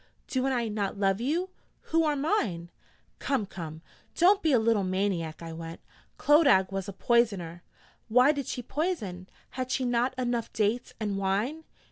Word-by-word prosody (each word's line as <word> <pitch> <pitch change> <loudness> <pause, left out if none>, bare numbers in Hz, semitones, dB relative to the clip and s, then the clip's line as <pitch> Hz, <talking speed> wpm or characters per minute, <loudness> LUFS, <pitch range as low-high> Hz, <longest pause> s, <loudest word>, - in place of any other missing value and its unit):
'Do 260 0 -1
I 245 -3 0
not 205 -2 -2
love 195 +1 +1
you, 340 +9 -1 0.4
who 330 0 +4
are 300 -1 +1
mine?' 215 - -1 0.5
'Come, 270 -7 0
come, 165 -4 -8 0.3
don't 390 +4 +5
be 320 - +2
a 260 - +5
little 220 -2 +2
maniac!' 185 -4 -1
I 165 -1 -6
went. 165 0 -7 0.4
'Clodagh 280 - +5
was 195 0 -3
a - - -6
poisoner....' 195 -7 +1 0.5
'Why 250 +5 +5
did 280 -4 -4
she 245 - -4
poison? 220 - -3 0.2
Had 255 0 -4
she 260 0 0
not 245 +1 0
enough 240 -2 -1
dates 220 +3 0
and 205 -3 -2
wine?' 215 +12 -1
230 Hz, 160 wpm, -28 LUFS, 190-270 Hz, 0.5 s, don't